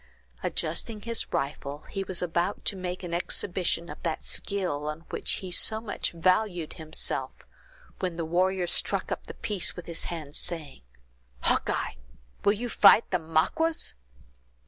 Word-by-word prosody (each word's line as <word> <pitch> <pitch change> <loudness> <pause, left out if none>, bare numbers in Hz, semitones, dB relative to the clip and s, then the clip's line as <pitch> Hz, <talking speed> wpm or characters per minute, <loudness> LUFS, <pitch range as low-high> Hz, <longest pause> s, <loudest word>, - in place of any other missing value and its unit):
Adjusting 220 -3 -1
his 230 +1 -1
rifle, 140 +1 -2
he 195 - -1
was 185 -2 -2
about 175 +3 0
to - - +1
make 185 0 -4
an 175 -1 -4
exhibition 175 0 +1
of - - -9
that 165 -2 -2
skill 180 -7 -1
on 155 +1 -3
which - - -1
he 185 -2 -4
so 220 +5 +3
much 220 -2 -2
valued 180 0 +1
himself, 160 0 -2 0.5
when 180 -3 -1
the 165 -1 -2
warrior 180 +2 +2
struck - - 0
up - - -3
the - - -7
piece 195 -5 0
with 180 - -7
his 170 -1 -2
hand, 155 -4 -5
saying: 155 - -1 0.6
"Hawkeye! - - +1 0.5
will 205 - +5
you 235 +4 -3
fight 220 0 +7
the 180 - +2
Maquas?" 165 - +1
180 Hz, 150 wpm, -28 LUFS, 165-195 Hz, 0.6 s, fight